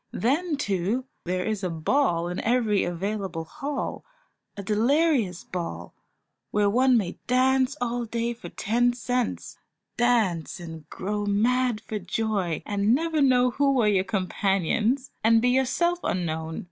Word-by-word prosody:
Then, 295 Hz, +6 st, 0 dB
too, 205 Hz, +1 st, -1 dB, 0.2 s
there 180 Hz, +1 st, -1 dB
is 215 Hz, -2 st, -2 dB
a 185 Hz, -, 0 dB
ball 170 Hz, -, +1 dB
in 180 Hz, +1 st, -4 dB
every 225 Hz, -4 st, +2 dB
available 185 Hz, -1 st, -3 dB
hall, 285 Hz, -, -5 dB, 0.5 s
a 200 Hz, -, -5 dB
delirious 230 Hz, -, +2 dB
ball, 165 Hz, -, -6 dB, 0.6 s
where 205 Hz, -1 st, +2 dB
one 255 Hz, +2 st, +4 dB
may 195 Hz, -6 st, -2 dB
dance 260 Hz, +2 st, +2 dB
all 240 Hz, 0 st, -2 dB
day 235 Hz, +1 st, -2 dB
for 235 Hz, -, -10 dB
ten 240 Hz, +3 st, +1 dB
cents; 245 Hz, 0 st, -3 dB, 0.4 s
dance 220 Hz, -10 st, +1 dB
and 160 Hz, -3 st, -9 dB
grow 205 Hz, +2 st, -3 dB
mad 235 Hz, +2 st, +1 dB
for 215 Hz, -1 st, -5 dB
joy, 190 Hz, -3 st, -2 dB
and 205 Hz, +3 st, +2 dB
never 320 Hz, +1 st, 0 dB
know 250 Hz, -2 st, +4 dB
who 280 Hz, +2 st, +2 dB
were 245 Hz, -5 st, +3 dB
your 195 Hz, -3 st, +3 dB
companions, 195 Hz, -, 0 dB
and 225 Hz, +1 st, +5 dB
be 245 Hz, +2 st, +2 dB
yourself 305 Hz, +8 st, +1 dB
unknown. 160 Hz, -3 st, -2 dB
220 Hz, 140 wpm, -26 LUFS, 185-255 Hz, 0.6 s, and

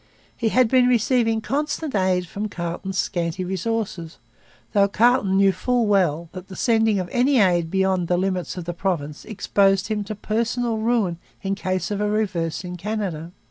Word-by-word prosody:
He 230 Hz, -, 0 dB
had 255 Hz, +1 st, +4 dB
been 250 Hz, +1 st, +4 dB
receiving 235 Hz, -2 st, +2 dB
constant 295 Hz, +4 st, -2 dB
aid 185 Hz, -2 st, +1 dB
from 205 Hz, +5 st, -5 dB
Carleton's 180 Hz, +2 st, -4 dB
scanty 175 Hz, -1 st, -1 dB
resources, 190 Hz, -3 st, -3 dB, 0.6 s
though 200 Hz, -2 st, +4 dB
Carleton 210 Hz, -2 st, +3 dB
knew 195 Hz, 0 st, +5 dB
full 240 Hz, +6 st, 0 dB
well 175 Hz, -6 st, +2 dB
that 185 Hz, 0 st, -9 dB
the 190 Hz, -, -10 dB
sending 225 Hz, -2 st, +2 dB
of 180 Hz, -, -3 dB
any 260 Hz, +3 st, +3 dB
aid 175 Hz, -6 st, +3 dB
beyond 190 Hz, -1 st, +1 dB
the 175 Hz, -, +1 dB
limits 185 Hz, -1 st, -2 dB
of 175 Hz, -, -5 dB
the 175 Hz, -, -3 dB
province 165 Hz, -5 st, -3 dB
exposed 195 Hz, -2 st, +1 dB
him 210 Hz, -1 st, -1 dB
to 215 Hz, +1 st, -5 dB
personal 230 Hz, +2 st, -1 dB
ruin 220 Hz, -7 st, 0 dB, 0.2 s
in 195 Hz, 0 st, -1 dB
case 185 Hz, -2 st, -2 dB
of 205 Hz, 0 st, -2 dB
a 210 Hz, -, +1 dB
reverse 190 Hz, -6 st, -1 dB
in 180 Hz, 0 st, -6 dB
Canada. 180 Hz, -5 st, -4 dB
195 Hz, 175 wpm, -23 LUFS, 180-225 Hz, 0.6 s, knew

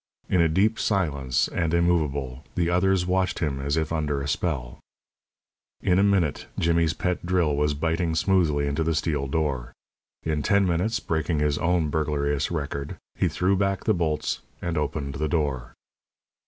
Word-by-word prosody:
In 90 Hz, -, +3 dB
a 85 Hz, -, +4 dB
deep 105 Hz, +7 st, +2 dB
silence 70 Hz, -, +1 dB
and 80 Hz, 0 st, 0 dB
immovable, 75 Hz, -6 st, 0 dB
the 85 Hz, -1 st, +1 dB
others 90 Hz, +1 st, +2 dB
watched 95 Hz, 0 st, +1 dB
him 70 Hz, -4 st, -1 dB
as 70 Hz, +3 st, -1 dB
if 80 Hz, 0 st, -1 dB
under 75 Hz, -3 st, -1 dB
a 70 Hz, -, -4 dB
spell. 70 Hz, -5 st, -2 dB, 1.0 s
In 90 Hz, 0 st, +3 dB
a -, -, +4 dB
minute 95 Hz, -8 st, +1 dB
Jimmy's 85 Hz, -1 st, +2 dB
pet 90 Hz, -1 st, -2 dB
drill 85 Hz, -4 st, +1 dB
was 75 Hz, 0 st, +1 dB
biting 80 Hz, +2 st, 0 dB
smoothly 80 Hz, -5 st, +2 dB
into 70 Hz, +3 st, 0 dB
the 80 Hz, 0 st, 0 dB
steel 75 Hz, -2 st, -1 dB
door. 65 Hz, -5 st, -2 dB, 0.5 s
In 75 Hz, -2 st, -1 dB
ten 100 Hz, +5 st, +3 dB
minutes 95 Hz, +6 st, 0 dB
breaking 80 Hz, -5 st, -1 dB
his 75 Hz, -1 st, +1 dB
own 85 Hz, -2 st, +1 dB
burglarious 75 Hz, -2 st, 0 dB
record 70 Hz, -3 st, -4 dB, 0.2 s
he -, -, +1 dB
threw 95 Hz, +2 st, +1 dB
back 100 Hz, 0 st, 0 dB
the -, -, +3 dB
bolts 80 Hz, -4 st, -1 dB, 0.2 s
and 85 Hz, -1 st, -3 dB
opened 70 Hz, -2 st, -2 dB
the 75 Hz, +2 st, -2 dB
door. 65 Hz, -7 st, -1 dB
80 Hz, 165 wpm, -25 LUFS, 70-90 Hz, 1.0 s, a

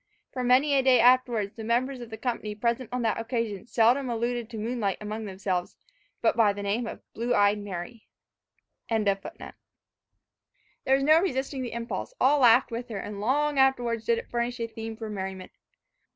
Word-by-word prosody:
For 255 Hz, -, -3 dB
many 260 Hz, +4 st, +4 dB
a 275 Hz, -, +4 dB
day 260 Hz, -2 st, +5 dB
afterwards 240 Hz, -4 st, +3 dB
the 225 Hz, -, -8 dB
members 250 Hz, +3 st, 0 dB
of 240 Hz, -, -8 dB
the 220 Hz, -, -7 dB
company 220 Hz, -2 st, -3 dB
present 235 Hz, +2 st, -1 dB
on 250 Hz, -1 st, -2 dB
that 225 Hz, -1 st, 0 dB
occasion 230 Hz, -4 st, -3 dB
seldom 245 Hz, +3 st, +3 dB
alluded 235 Hz, 0 st, -2 dB
to 230 Hz, -, -7 dB
moonlight 220 Hz, -3 st, -2 dB
among 215 Hz, 0 st, -5 dB
each 190 Hz, +1 st, -12 dB
other, 180 Hz, -2 st, 0 dB, 0.6 s
but -, -, +3 dB
by 215 Hz, -3 st, +4 dB
the 205 Hz, 0 st, -6 dB
name 215 Hz, +4 st, -1 dB
of -, -, -8 dB
"blue 240 Hz, +2 st, -1 dB
eyed 205 Hz, 0 st, +3 dB
Mary." 205 Hz, +2 st, -7 dB, 0.8 s
There 220 Hz, -2 st, +1 dB, 1.8 s
was 270 Hz, +1 st, +3 dB
no 310 Hz, +3 st, +6 dB
resisting 265 Hz, -6 st, -2 dB
the 245 Hz, -, -5 dB
impulse, 235 Hz, -, -5 dB
all 285 Hz, +3 st, +4 dB
laughed 245 Hz, 0 st, +5 dB
with 240 Hz, +2 st, -5 dB
her, 215 Hz, -, -4 dB
and 200 Hz, +1 st, -6 dB
long 285 Hz, +5 st, +1 dB
afterwards 245 Hz, -4 st, +2 dB
did 465 Hz, -, +2 dB
it 470 Hz, -, -7 dB
furnish 240 Hz, +1 st, -2 dB
a 230 Hz, -, -1 dB
theme 225 Hz, 0 st, -7 dB
for 225 Hz, -1 st, -6 dB
merriment. 190 Hz, -2 st, -6 dB
235 Hz, 180 wpm, -27 LUFS, 215-255 Hz, 1.8 s, no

